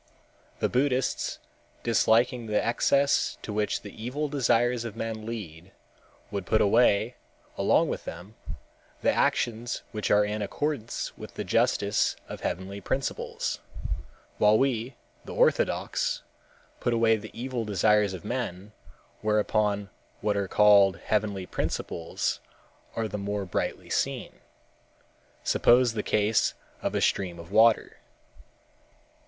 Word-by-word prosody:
"The - - +1
Buddhists, 130 0 0 0.5
disliking 115 +1 +2
the 105 -1 +2
excesses 140 +4 +2
to 105 - -5
which 105 0 -1
the 100 - -9
evil 145 +5 -2
desires 120 -3 +2
of 115 -3 -6
men 110 -1 -4
lead, 95 -5 -7 0.6
would 100 -3 -4
put 110 - +3
away, 110 +2 +3 0.4
along - - +3
with - - -4
them, 90 +6 -8 0.7
the - - +4
actions 120 +1 0
which 105 -1 -3
are 105 0 +5
in 105 +1 -3
accordance 130 +2 -3
with - - -10
the - - -3
justice 100 +1 +2
of - - -8
heavenly 95 +3 -4
principles, 135 +5 -2 0.8
while 105 +1 +6
we, 125 -1 0 0.3
the - - -7
orthodox, - - +1 0.6
put 120 - 0
away 115 -1 +4
the 110 0 -7
evil 125 -1 -2
desires 105 -1 +2
of 90 - -10
men, 105 -4 -4 0.5
whereupon 105 -2 +1 0.3
what 105 -1 0
are 100 -1 0
called 100 -2 +6
heavenly 100 -1 -1
principles 85 -2 -2 0.6
are 115 -1 -1
the 105 0 -5
more 100 0 -2
brightly 90 - -3
seen. - - -2 1.0
Suppose 120 -1 +4
the 110 - -1
case 105 +1 +2 0.3
of - - -2
a - - +1
stream 90 -3 0
of 85 +2 -11
water. 110 +1 +4
110 Hz, 125 wpm, -27 LUFS, 100-120 Hz, 1.0 s, while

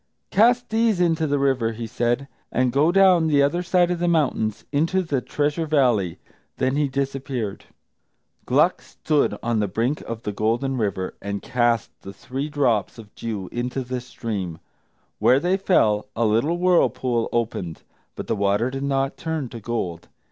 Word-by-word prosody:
"Cast 240 +4 +4
these 220 -3 +2
into 165 -3 +2
the 145 0 +1
river," 130 -5 +1
he 115 +1 -5
said, 120 +3 -1 0.2
"and 125 -1 +1
go 150 +5 +4
down 185 -3 +5
the 145 -2 +4
other 170 +5 +1
side 180 0 +2
of 175 - -1
the 175 - 0
mountains 140 -10 0
into 165 +6 +1
the 145 -6 -1
Treasure 150 +5 -1
Valley." 120 - +2 0.4
Then 130 +1 +1
he 145 0 +2
disappeared. 135 -5 -3 0.8
Gluck - - +3
stood 150 -2 0
on 115 -1 0
the 105 - +1
brink 115 +9 -1
of 115 0 -7
the 105 - -2
Golden 115 +6 0
River, 100 -6 -2
and 100 0 -4
cast 120 -2 +1
the 95 - -9
three 135 +8 -5
drops 130 -6 0
of 110 -2 -13
dew 105 -5 -5
into 125 +2 -3
the 125 0 -4
stream. 105 -9 -5 0.6
Where 130 - +5
they 175 +5 +1
fell, 110 - +2
a 115 - +1
little 115 +11 +2
whirlpool 130 -9 +2
opened; 110 -8 -2 0.3
but - - -6
the - - -1
water 100 +4 +1
did 135 0 -4
not 135 -1 -1
turn 160 -6 -3
to 115 - -8
gold. 100 -7 -4
130 Hz, 170 wpm, -23 LUFS, 115-155 Hz, 0.8 s, down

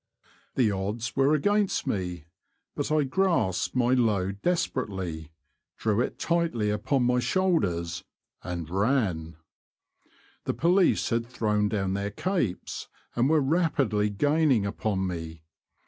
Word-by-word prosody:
The 120 -5 +3
odds 105 +5 -3
were 140 +3 +4
against 205 +6 +1
me, 90 -5 -3 0.5
but - - -3
I 155 -1 +3
grasped 130 - +1
my 125 0 +3
load 100 -5 +1
desperately, 95 - -2 0.5
drew 110 0 +1
it - - -2
tightly 165 -12 0
upon 125 +6 0
my 125 0 +3
shoulders, 100 - 0 0.4
and 85 -2 -5
ran. 95 - 0 1.1
The - - -1
police 180 -1 +3
had 115 0 0
thrown 105 -4 0
down 95 -3 -1
their 100 +1 -2
capes, 130 - -2 0.3
and 120 +3 +2
were 155 -1 +4
rapidly 135 -9 +1
gaining 145 0 +2
upon 100 -1 -1
me. 80 -3 -5
110 Hz, 120 wpm, -27 LUFS, 95-140 Hz, 1.1 s, were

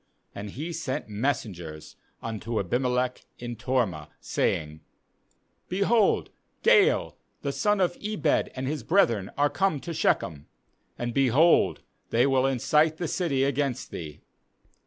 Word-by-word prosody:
31And 100 +1 -6
he 155 - -5
sent 145 -9 -4
messengers 100 - -3 0.3
unto 115 0 -3
Abimelech 125 +5 0
in 120 0 -6
Tormah, 115 - -1
saying: 75 0 -1 0.9
'Behold, 200 +3 +2 0.3
Gaal 450 0 +4 0.3
the - - -1
son 210 -2 +1
of 180 -2 +2
Ebed 205 -8 +1
and 130 0 -3
his 150 0 -2
brethren 115 - +2
are 145 +1 +4
come 190 -2 +1
to 170 - -5
Shechem; 75 - 0 0.5
and, 120 0 -3
behold, 135 +6 +4 0.3
they 120 +2 +3
will 135 -1 +3
incite 150 +5 +2
the 175 - -2
city 150 -6 0
against 140 -2 -1
thee. 75 -3 -7
130 Hz, 125 wpm, -27 LUFS, 110-160 Hz, 0.9 s, Gaal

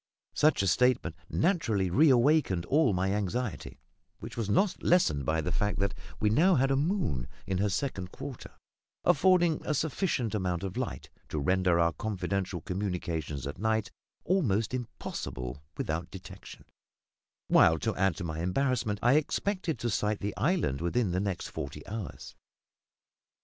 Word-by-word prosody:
Such 155 -9 +3
a - - +1
statement 125 +5 +2
naturally 115 - +1
reawakened 135 - +4
all 145 -4 +3
my 95 +1 0
anxiety; 105 +3 -3 0.4
which - - -9
was 115 -3 -2
not 185 - +2
lessened 75 - +2
by 80 +1 +1
the 90 - -3
fact 105 +6 0
that 100 0 0 0.3
we 105 - +2
now 175 - +5
had 135 0 +2
a - - +3
moon, 145 - 0 0.2
in 95 -1 -1
her 105 +1 +2
second 95 -4 -3
quarter, 130 -4 -8 0.5
affording 175 0 +4
a 150 - -1
sufficient 145 - -1
amount 90 -4 -1
of 95 0 -4
light 125 -1 -4 0.2
to - - -4
render 90 +3 +2
our 85 -1 +3
confidential 95 -3 -3
communications 85 -7 -3
at 70 +5 -6
night 110 0 0 0.3
almost 115 - +1
impossible 70 - -5 0.2
without 80 +2 -2
detection; 95 +1 -11 0.8
while, 80 - +5
to 110 +6 -2
add 95 -2 +2
to 90 - -6
my 80 -2 -4
embarrassment, 110 +3 0
I 125 +5 +5
expected 175 +1 -1
to 120 +1 -2
sight 105 +1 0
the 100 0 -3
island 145 - 0
within 95 +4 0
the 90 - 0
next 100 -2 -3
forty 70 - -6
hours. 100 - -7
105 Hz, 150 wpm, -29 LUFS, 90-135 Hz, 0.8 s, now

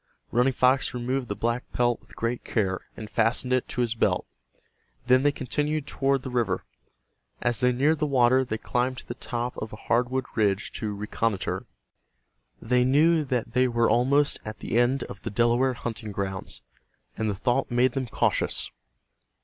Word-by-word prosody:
Running 125 +3 +3
Fox 130 0 +2
removed 125 +1 -2
the 100 - -3
black 120 +4 -2
pelt 120 -1 +1
with - - -16
great 115 +1 -2
care, 95 -4 0 0.2
and 110 - -6
fastened 115 +4 +1
it 130 - +1
to 125 - -2
his 120 -2 +1
belt. 115 - +1 0.8
Then 130 +1 +5
they 145 +1 +3
continued 150 +2 -2
toward 135 -2 0
the 130 - -5
river. 120 -2 0 0.8
As 120 -1 +2
they 125 -1 +4
neared 145 +5 +2
the 150 - +1
water 130 -1 +4
they 110 -4 -3
climbed 125 +3 -1
to - - -10
the - - -4
top 120 0 -4
of 110 - -5
a - - -7
hardwood 125 +3 0
ridge 105 -2 +1
to 105 -2 -3
reconnoiter. 105 0 -2 0.9
They 125 +2 +2
knew 155 +5 +4
that 120 -3 -2
they 130 0 +4
were 115 -1 +2
almost 140 +4 +3
at 110 0 -7
the - - -4
end 125 +3 +2
of 100 - -9
the - - -4
Delaware 120 +4 +2
hunting 115 -2 -5
grounds, 95 -10 -4 0.5
and 110 0 -1
the 100 - -1
thought 120 +5 0
made 125 +1 +3
them 130 0 -3
cautious. - - 0
120 Hz, 175 wpm, -26 LUFS, 115-130 Hz, 0.9 s, Then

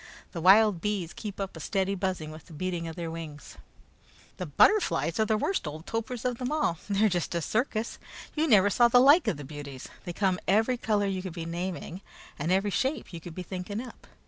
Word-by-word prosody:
The 170 - -5
wild 195 0 +6
bees 195 -5 -2
keep 205 -3 -7
up 195 -2 -4
a - - -8
steady 195 +4 0
buzzing 185 -5 -2
with 155 -1 -11
the 170 - -13
beating 175 +1 -3
of 165 - -6
their 170 -2 -4
wings. 160 -3 -8 0.8
"The 180 - -4
butterflies 180 - +3
are 220 - +4
the 220 0 +2
worst 370 - -1
old 155 +3 -7
topers 230 +3 -4
of 245 -2 -1
them 250 +1 -2
all. 300 - 0
They're 205 +2 +3
just 175 -3 -1
a - - +2
circus! 220 - -1 0.3
You 315 +1 +1
never 205 -6 +5
saw 240 +4 +5
the 235 - +5
like 285 +7 +6
of 160 - +1
the 145 - -7
beauties! 140 -2 -8 0.2
They 175 - -3
come 185 0 +1
every 225 +5 +3
color 210 -3 +1
you 190 -2 -1
could 185 -2 -6
be 165 -1 -5
naming, 175 +2 -4 0.4
and 155 +5 -1
every 195 +2 +2
shape 265 -2 -1
you 165 - -7
could 165 0 -9
be 185 - -5
thinking 185 +3 -5
up. 245 0 -10
190 Hz, 220 wpm, -28 LUFS, 165-220 Hz, 0.8 s, wild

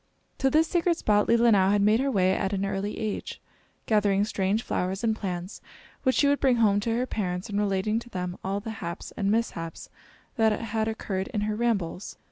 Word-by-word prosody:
To 270 - +3
this 310 +4 +4
sacred 345 -1 +1
spot 210 -6 +2
Leelinau 230 -5 +4
had 205 0 +3
made 215 +2 +4
her 275 +1 +1
way 190 -6 +2
at 195 +1 -1
an 195 0 0
early 195 +1 -3
age, 215 -2 -4 0.5
gathering 205 -2 +2
strange 210 +1 0
flowers 185 +3 -2
and 220 -1 +2
plants, 185 -2 -5 0.4
which 260 -2 +2
she 285 - +4
would 285 0 +2
bring 265 -3 +3
home 210 -3 +3
to 225 +2 -1
her 250 - 0
parents, 180 -6 -3
and 205 0 -1
relating 205 +2 0
to 240 - -12
them 180 -3 -4
all 195 +1 -1
the 220 +2 -6
haps 170 +1 -6
and 200 -1 0
mishaps 200 -7 -2 0.5
that 220 -2 +3
had 220 -1 -2
occurred 195 -4 -3
in 210 - +1
her 210 0 -1
rambles. 205 -6 -2
210 Hz, 200 wpm, -27 LUFS, 195-230 Hz, 0.5 s, this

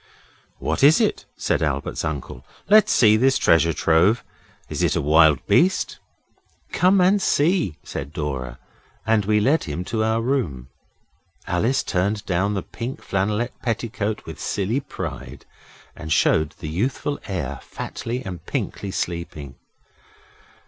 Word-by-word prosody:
'What - - -2
is 150 +3 +7
it?' - - 0
said - - 0
Albert's 70 -3 -2
uncle. 70 -4 -5 0.2
'Let's 215 +2 +6
see 110 -2 +5
this 130 +3 +3
treasure 85 0 +4
trove. 85 +8 +2 0.4
Is - - -4
it - - +2
a - - +1
wild 75 +1 +4
beast?' 185 +3 +2 0.7
'Come 190 +2 +3
and 190 +3 +4
see,' 155 - +2
said 70 +1 -6
Dora, 70 -7 -4 0.5
and 110 -2 +2
we 105 +1 +3
led 140 +9 +2
him 80 +2 -4
to 110 +1 -1
our 110 +1 +1
room. 115 - -2 0.8
Alice 110 +10 +1
turned 100 +3 -1
down 95 +3 0
the 95 - -2
pink 120 +3 -6
flannelette 105 +5 -2
petticoat 110 -2 -3
with 80 - -9
silly 105 +6 -1
pride, 135 - -7 0.5
and 80 0 -8
showed 80 0 +2
the 80 - -7
youthful 130 - -2
heir 90 -10 -4
fatly 125 +3 -6
and 90 -4 -7
pinkly 100 - -3
sleeping. 85 -6 -4
100 Hz, 135 wpm, -22 LUFS, 80-120 Hz, 0.8 s, is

